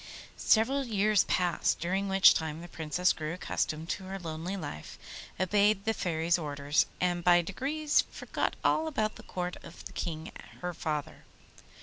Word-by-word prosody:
Several 260 +6 +3
years 215 -3 +2
passed, 180 -2 +1
during 190 +4 -1
which 195 0 +7
time 160 0 -3
the 175 - -8
Princess 165 +2 0
grew 155 +2 -4
accustomed 160 -3 -2
to 190 - -3
her 190 +1 -5
lonely 170 +2 -5
life, 75 - -7 0.4
obeyed 200 +2 +3
the 225 - +2
Fairy's 170 -2 0
orders, 145 -1 0
and 175 -1 0
by 175 0 +5
degrees 290 - +1
forgot - - -3
all 320 - +2
about 220 -8 -1
the - - -11
court 180 -1 -3
of 170 - -12
the - - -8
King 160 -2 -4 0.3
her 180 0 -3
father. 150 -3 -4
180 Hz, 155 wpm, -30 LUFS, 160-200 Hz, 0.4 s, which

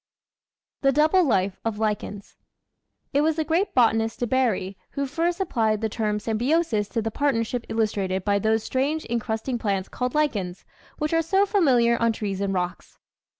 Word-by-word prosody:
The 275 - +4
Double 310 +6 +4
Life 195 - +1
of 225 -2 -2
Lichens 210 -2 -3 0.8
It 285 - +3
was 315 +1 +2
the 315 - 0
great 335 +6 0
botanist 225 -2 +2
De 245 - 0
Bary 230 -7 0 0.2
who 280 -1 -1
first 335 +6 -1
applied 220 - +1
the 220 - 0
term 210 -1 -1
symbiosis 225 0 0
to 230 - -2
the 225 - -2
partnership 245 -3 -1
illustrated 200 -4 -1
by 200 -1 +2
those 220 +1 +1
strange 285 +5 -1
encrust 225 -1 -2
ing 250 -3 -1
plants 195 -3 -1
called 250 +1 -3
lichens 205 -12 -1 0.3
which 305 +1 -2
are 330 - +4
so 385 +5 +2
familiar 250 - +3
on 230 -1 +3
trees 200 -3 -3
and 200 -1 0
rocks. 180 -1 -4
230 Hz, 170 wpm, -24 LUFS, 210-290 Hz, 0.8 s, The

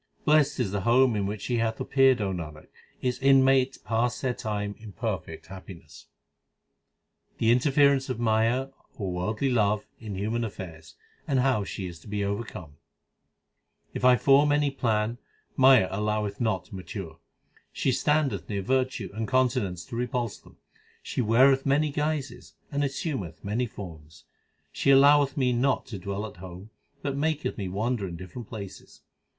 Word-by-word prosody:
Blest 150 -2 +3
is 110 -7 0
the 100 -1 -2
home 120 +3 +4
in 100 -1 0
which 105 0 -5
she 120 - -1
hath 115 -1 -1
appeared 135 -2 +4
Nanak, 85 -7 -4 0.4
its 125 -1 -1
inmates 135 -1 +4
pass 115 +2 -1
their 130 -2 -1
time 105 -4 -3
in 110 -2 -11
perfect 95 -8 -4
happiness. 90 -5 -12 1.3
The 115 - +3
interference 135 +1 +3
of 125 -3 -3
Maya, 115 +3 +1 0.3
or 95 -4 -3
worldly 105 +9 -1
love, 105 -3 +1
in 110 -3 -6
human 110 +5 -1
affairs, 85 -7 -8 0.3
and 135 - +1
how 130 -5 +2
she 95 -1 -5
is 85 -2 -8
to - - -17
be 105 -1 -2
overcome: 100 -7 -5 1.2
If - - -5
I 125 0 +7
form 140 +3 +4
any 145 -1 +2
plan, 115 -3 -1 0.4
Maya 130 -7 +6
alloweth 105 0 -1
it - - -8
not 105 -6 0
to 110 - -11
mature: 85 -3 -7 0.5
She 135 - 0
standeth 135 - 0
near 100 -2 -2
virtue 130 -2 -1
and 110 +1 -3
continence 110 -9 0
to 115 - -8
repulse 120 -2 -2
them; - - -20 0.5
She - - -2
weareth 130 +4 +4
many 145 +2 +2
guises 150 -4 -3 0.2
and 145 0 0
assumeth 130 - -4
many 115 +5 -1
forms; 80 -6 -11 0.5
She - - 0
alloweth 140 0 +6
me 125 -2 +2
not 130 +3 +1
to 105 -6 -6
dwell 100 +3 -4
at 105 - -10
home, 95 +3 -10 0.3
but 140 -1 -2
maketh 155 +1 -1
me 100 -3 -4
wander 105 +2 -1
in 85 - -6
different 95 +6 -9
places. 100 -4 -9
115 Hz, 160 wpm, -27 LUFS, 100-130 Hz, 1.3 s, I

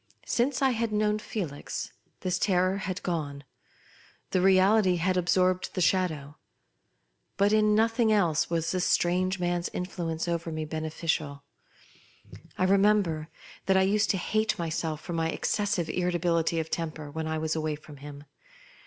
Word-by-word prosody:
Since 260 +3 0
I 265 - +4
had 230 -2 -1
'known 210 0 +1
Felix 175 -10 -5 0.3
this 185 0 -1
terror 185 0 +2
had 190 -1 -4
gone. 145 -5 -3 0.9
The 185 - +2
reality 190 +1 +4
had 180 +2 0
ab 180 -1 0
sorbed 185 0 +2
the - - -1
shadow. 160 -5 0 1.0
But 200 +1 +3
in 215 -1 +4
nothing 225 +1 +3
else 175 -7 +2
was 165 -1 -1
this 185 -1 0
strange 185 +2 +1
man's 175 0 -1
influence 170 -2 -3
over 170 -1 -2
me 155 0 -3
bene 155 0 -4
ficial. 155 -3 -2 1.1
I - - +1
remember 195 -5 +2 0.4
that 190 0 +4
I 190 - +5
used 205 +2 +2
to 195 - +2
hate 215 +4 0
my 170 -1 -2
self 160 -1 -3
for 175 - -6
my 165 -1 0
excessive 195 -2 -1
irritability 170 -2 0
of 160 0 -4
temper 155 -3 -4
when 160 +1 -4
I 160 0 -1
was 155 0 -1
away 155 -1 -1
from 150 -1 -13
him. 145 +1 -10
175 Hz, 160 wpm, -28 LUFS, 160-195 Hz, 1.1 s, I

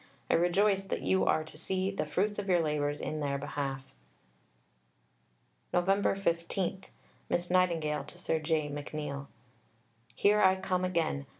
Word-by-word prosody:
I - - +4
rejoice 195 +3 +3
that - - -3
you 190 - +2
are 155 - +2
to 155 -1 -12
see 190 +3 -1
the 195 - -3
fruits 205 +7 0
of 200 -1 -4
your 180 -2 +5
labours 150 -2 0
in 155 - -3
their 140 -2 -1
behalf. 140 -1 -4 1.9
Nov. 175 0 +2 0.3
15 185 +1 -1 0.4
(Miss 175 0 -1
Nightingale 165 -5 +2
to - - -11
Sir 165 -3 -1
J. 155 -1 0
McNeill). 145 -1 -5 0.9
Here 210 +1 +4
I 190 -1 +6
come 185 -1 -1
again. 160 -6 0
170 Hz, 140 wpm, -31 LUFS, 150-190 Hz, 1.9 s, I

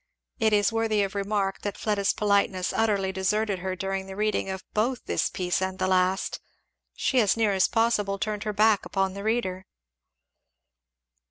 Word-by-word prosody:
It 220 -2 +3
is 205 0 +3
worthy 225 -2 +1
of 195 +1 -3
remark 200 -1 -1
that 205 - -4
Fleda's 205 -2 +1
politeness 200 -3 +1
utterly 200 -4 +1
deserted 200 +1 0
her 185 +1 -3
during 195 0 -3
the 190 - -8
reading 210 -1 0
of 190 0 -5
both 240 +4 0
this - - 0
piece 180 0 -1
and 190 0 -2
the 185 - 0
last. 185 0 +1 0.6
She 260 - +1
as 215 -1 +3
near 215 -3 +2
as 190 -1 +3
possible 220 -4 +1
turned 210 +1 -3
her 215 - -2
back 210 0 +3
upon 195 -1 -1
the 200 - -6
reader. 195 -4 -1
200 Hz, 170 wpm, -26 LUFS, 190-215 Hz, 0.6 s, It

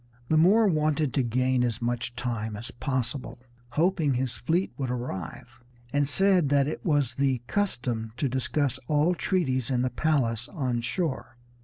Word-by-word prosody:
The 160 - +3
Moor 200 +8 +5
wanted 155 - +1
to 135 - +2
gain 125 +1 +1
as 120 -2 -1
much 120 0 -2
time 115 -3 -3
as 115 +3 -5
possible, 130 0 -2 0.4
hoping 160 -4 +2
his 125 0 -1
fleet 170 - 0
would 135 -4 -3
arrive, 120 0 -5 0.3
and 145 -1 +2
said 185 -2 +3
that 140 -1 +3
it 155 - -4
was 145 -6 +1
the 130 -2 0
custom 120 - -2
to 140 - 0
discuss 130 +1 -1
all 155 +4 +3
treaties 135 - 0
in 125 -2 +1
the 130 - 0
palace 125 -5 0
on 130 -9 -2
shore. 130 0 -3
130 Hz, 160 wpm, -27 LUFS, 120-155 Hz, 0.4 s, Moor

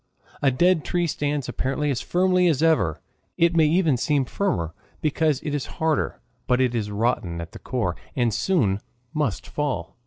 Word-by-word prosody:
A 140 - +4
dead 170 +5 +3
tree 175 -1 0
stands 145 -3 -1
apparently 135 +4 -1
as 130 - -1
firmly 180 0 +2
as 155 -3 +2
ever 95 - +2 0.4
it 170 0 +3
may 160 -2 +5
even 160 -4 +3
seem 140 +2 +1
firmer 85 - -1 0.3
because 155 -2 +1
it 150 - -3
is 145 -2 -2
harder 160 -2 0 0.3
but 125 0 +3
it 130 -2 +2
is 110 -3 -1
rotten 100 -5 -1
at 85 +1 -7
the - - -10
core, 100 -9 -2 0.2
and 120 -4 +1
soon 110 - +1 0.3
must 150 - -1
fall. 130 - -3
145 Hz, 175 wpm, -24 LUFS, 115-160 Hz, 0.4 s, may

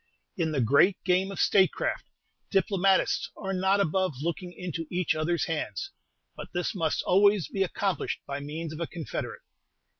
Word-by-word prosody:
In 165 -4 0
the 140 -4 0
great 140 - +4
game 185 +1 +2
of 195 - -7
statecraft, 190 -2 +2 0.4
diplomatists 195 0 +2
are 195 -1 -3
not 190 +2 +2
above 185 -3 +1
looking 170 +4 -3
into 170 -3 -5
each 180 -1 +1
other's 160 +2 0
hands; 165 - -3 0.4
but - - -7
this 175 - -1
must 165 -5 0
always 200 -1 +4
be 195 - -3
accomplished 195 -2 -1
by 140 0 -4
means 155 +3 -5
of 155 - -8
a 170 - -2
confederate. 165 -3 -5
180 Hz, 155 wpm, -28 LUFS, 160-195 Hz, 0.4 s, great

